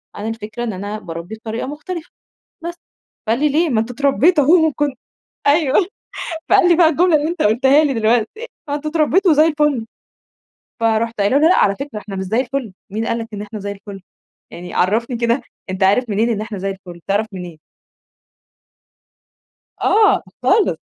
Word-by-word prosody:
أنا 210 Hz, -, -5 dB
الفكرة 225 Hz, +1 st, -5 dB
إن 225 Hz, -, -2 dB
أنا 205 Hz, +3 st, -5 dB
باربّي 170 Hz, +3 st, -7 dB
بطريقة 225 Hz, +2 st, -5 dB
مختلفة، 320 Hz, +3 st, -6 dB, 0.5 s
بس." 345 Hz, 0 st, -4 dB, 0.5 s
فقال 230 Hz, +4 st, +1 dB
لي: 300 Hz, 0 st, +3 dB
"ليه؟ 325 Hz, +4 st, +2 dB
ما 235 Hz, -5 st, +1 dB
أنتم 225 Hz, +3 st, -3 dB
اتربّيتوا 285 Hz, +5 st, +3 dB
أهو 320 Hz, +3 st, +5 dB
وكنت" 290 Hz, -3 st, -1 dB, 0.5 s
أيوه. 300 Hz, +4 st, +3 dB, 0.6 s
فقال 390 Hz, -2 st, +5 dB
لي 345 Hz, -, +6 dB
بقى 330 Hz, -1 st, +5 dB
الجملة 335 Hz, +1 st, +3 dB
اللي 295 Hz, +1 st, +1 dB
أنت 345 Hz, +2 st, -3 dB
قٌلتها 265 Hz, +8 st, +4 dB
لي 290 Hz, -3 st, +1 dB
دلوقتي، 235 Hz, -, 0 dB, 0.2 s
ما 285 Hz, -, -1 dB
أنتم 300 Hz, +1 st, -3 dB
اتربّيتوا 330 Hz, +3 st, +3 dB
وزي 305 Hz, +2 st, +5 dB
الفل، 295 Hz, -6 st, +1 dB, 1.0 s
فرُحت 225 Hz, 0 st, 0 dB
قايلة 205 Hz, +8 st, +3 dB
له: 315 Hz, +3 st, +5 dB
"لأ 370 Hz, -, +4 dB
على 200 Hz, -, +3 dB
فكرة 275 Hz, -6 st, -6 dB
إحنا 200 Hz, -1 st, -8 dB
مش 190 Hz, -, -3 dB
زي 220 Hz, +6 st, 0 dB
الفًل، 260 Hz, -4 st, -3 dB, 0.2 s
مين 220 Hz, +3 st, -3 dB
قال 230 Hz, -, -1 dB
لك 225 Hz, -1 st, -6 dB
إن 205 Hz, -, -5 dB
إحنا 215 Hz, +1 st, -7 dB
زي 200 Hz, +1 st, -4 dB
الفُل 195 Hz, -1 st, -10 dB, 0.5 s
يعني 175 Hz, 0 st, -9 dB
عرّفني 230 Hz, +6 st, +1 dB
كده، 235 Hz, +3 st, +1 dB, 0.3 s
أنت 190 Hz, +1 st, -1 dB
عارف 215 Hz, +5 st, +3 dB
منين 220 Hz, +4 st, +1 dB
إن 215 Hz, -2 st, -1 dB
إحنا 215 Hz, -1 st, -5 dB
زي 195 Hz, +1 st, -3 dB
الفُل 185 Hz, -3 st, -11 dB
تعرف 205 Hz, +2 st, +1 dB
منين؟" 175 Hz, -4 st, -8 dB, 2.2 s
آه 425 Hz, 0 st, +4 dB, 0.2 s
خالص. 435 Hz, -, +3 dB
235 Hz, 180 wpm, -19 LUFS, 210-300 Hz, 2.2 s, لي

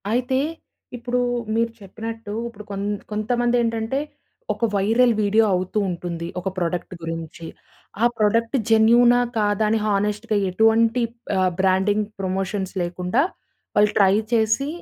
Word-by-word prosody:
అయితే 250 Hz, +3 st, +1 dB, 0.6 s
ఇప్పుడు 245 Hz, +1 st, -2 dB, 0.4 s
మీరు 230 Hz, 0 st, +1 dB
చెప్పినట్టు 225 Hz, +2 st, -7 dB
ఇప్పుడు 215 Hz, -3 st, -10 dB
కొంత 200 Hz, +1 st, -2 dB, 0.2 s
కొంతమంది 240 Hz, +3 st, 0 dB
ఏంటంటే 230 Hz, +3 st, -1 dB, 0.5 s
ఒక 235 Hz, -, -1 dB
వైరల్ 230 Hz, +5 st, +3 dB
వీడియో 210 Hz, +2 st, +3 dB
అవుతూ 185 Hz, +3 st, -1 dB
ఉంటుంది 170 Hz, -1 st, -4 dB
ఒక 180 Hz, -, -6 dB
ప్రొడక్ట్ 175 Hz, +1 st, -2 dB
గురించి. 165 Hz, 0 st, -6 dB, 0.6 s
ఆ -, -, +6 dB
ప్రొడక్ట్ 230 Hz, +4 st, +1 dB
జెన్యూనా? 235 Hz, +2 st, +5 dB, 0.2 s
కాదా? 205 Hz, 0 st, +1 dB
అని 220 Hz, +1 st, +2 dB
హానెస్ట్‌గా 210 Hz, +1 st, 0 dB
ఎటువంటి 225 Hz, +4 st, +3 dB, 0.4 s
ఆహ్, 185 Hz, -1 st, +2 dB
బ్రాండింగ్ 190 Hz, +3 st, +2 dB
ప్రమోషన్స్ 190 Hz, 0 st, -2 dB
లేకుండా, 180 Hz, +7 st, 0 dB, 0.5 s
వాళ్ళు 210 Hz, 0 st, +4 dB
ట్రై 195 Hz, -1 st, +5 dB, 0.2 s
చేసి 225 Hz, +4 st, +2 dB
210 Hz, 120 wpm, -22 LUFS, 190-230 Hz, 0.6 s, ఆ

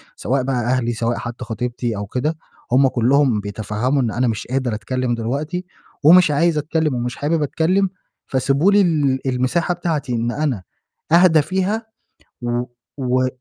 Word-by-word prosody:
سواء 130 Hz, 0 st, -1 dB
بقى 135 Hz, 0 st, -1 dB
أهلي 120 Hz, 0 st, 0 dB
سواء 115 Hz, +1 st, -1 dB
حتّي 120 Hz, +1 st, -6 dB
خطيبتي 120 Hz, 0 st, -3 dB
أو 100 Hz, 0 st, -4 dB
كده، 150 Hz, +8 st, -2 dB, 0.3 s
هم 135 Hz, +2 st, +5 dB
كلّهم 130 Hz, -1 st, +2 dB
بيتفهّموا 110 Hz, +6 st, -1 dB
إن 115 Hz, -3 st, 0 dB
أنا 125 Hz, +2 st, 0 dB
مش 110 Hz, -1 st, -3 dB
قادر 130 Hz, -2 st, -1 dB
أتكلِّم 120 Hz, +3 st, -2 dB
دلوقتي، 150 Hz, +10 st, -3 dB, 0.4 s
ومش 165 Hz, 0 st, +7 dB
عايز 160 Hz, +2 st, +2 dB
أتكلِّم 155 Hz, -2 st, 0 dB
ومش 120 Hz, 0 st, -3 dB
حابب 150 Hz, +1 st, 0 dB
أتكلِّم، 180 Hz, +6 st, +1 dB, 0.4 s
فسيبوا 140 Hz, +8 st, +2 dB
لي 205 Hz, 0 st, +5 dB
ال 145 Hz, -7 st, +2 dB
المساحة 130 Hz, +8 st, 0 dB
بتاعتي 155 Hz, -7 st, -2 dB
إن 120 Hz, +1 st, -1 dB
أنا 135 Hz, -10 st, -2 dB, 0.5 s
أهدى 170 Hz, -3 st, +6 dB
فيها 190 Hz, +7 st, -1 dB, 0.6 s
و 120 Hz, 0 st, -1 dB, 0.4 s
و 130 Hz, 0 st, +1 dB
130 Hz, 150 wpm, -20 LUFS, 120-160 Hz, 0.6 s, ومش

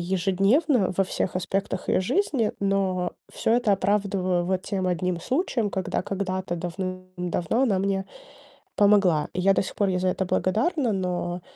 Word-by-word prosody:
ежедневно 195 Hz, -, +2 dB
во 195 Hz, -, +3 dB
всех 185 Hz, 0 st, -2 dB
аспектах 190 Hz, 0 st, -2 dB
её -, -, +3 dB
жизни. 255 Hz, -, 0 dB
Но 195 Hz, -2 st, 0 dB, 0.2 s
всё -, -, -1 dB
это 240 Hz, -3 st, +3 dB
оправдываю 195 Hz, -3 st, +1 dB
вот 185 Hz, +1 st, -1 dB
тем 190 Hz, -2 st, -2 dB
1 180 Hz, -1 st, -1 dB
случаем, 255 Hz, -, -1 dB
когда 190 Hz, -, -2 dB
когда-то 185 Hz, -2 st, -3 dB
давным-давно 185 Hz, +3 st, -3 dB
она 205 Hz, -8 st, +2 dB
мне 195 Hz, 0 st, 0 dB, 0.7 s
помогла, 200 Hz, -7 st, +4 dB
и 180 Hz, -, -3 dB
я 195 Hz, +1 st, +4 dB
до -, -, +2 dB
сих -, -, -7 dB
пор 200 Hz, -2 st, +1 dB
ей 180 Hz, -1 st, 0 dB
за 185 Hz, -, 0 dB
это 190 Hz, -, -1 dB
благодарна. 235 Hz, -, +1 dB
Но 180 Hz, -1 st, -2 dB
190 Hz, 155 wpm, -25 LUFS, 180-205 Hz, 0.7 s, помогла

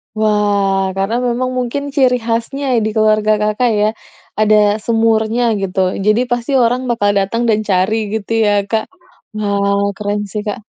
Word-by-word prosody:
Wah, 200 Hz, -3 st, +1 dB
karena 195 Hz, +4 st, -1 dB
memang 245 Hz, +1 st, -1 dB
mungkin 250 Hz, +3 st, -2 dB
ciri 255 Hz, -3 st, +3 dB
khasnya 235 Hz, +5 st, -2 dB, 0.2 s
di -, -, 0 dB
keluarga 215 Hz, 0 st, +3 dB
Kakak 215 Hz, +3 st, +1 dB
ya, 210 Hz, -, +3 dB, 0.5 s
ada 215 Hz, 0 st, +4 dB, 0.3 s
semurnya, 225 Hz, 0 st, +1 dB, 0.2 s
gitu. 190 Hz, -1 st, -3 dB, 0.3 s
Jadi 215 Hz, +3 st, +3 dB
pasti 240 Hz, +2 st, -1 dB
orang 245 Hz, 0 st, +2 dB
bakal 215 Hz, -4 st, +1 dB
datang 200 Hz, +4 st, 0 dB
dan 215 Hz, -1 st, +2 dB
cari 190 Hz, +3 st, +2 dB, 0.2 s
gitu 220 Hz, -1 st, -4 dB
ya, 205 Hz, -, +3 dB, 0.2 s
Kak? 220 Hz, 0 st, 0 dB, 0.5 s
Wah, 200 Hz, -1 st, 0 dB
keren 205 Hz, 0 st, -2 dB
sih 210 Hz, -, -3 dB
Kak. 210 Hz, -, -3 dB
215 Hz, 150 wpm, -16 LUFS, 205-235 Hz, 0.5 s, ada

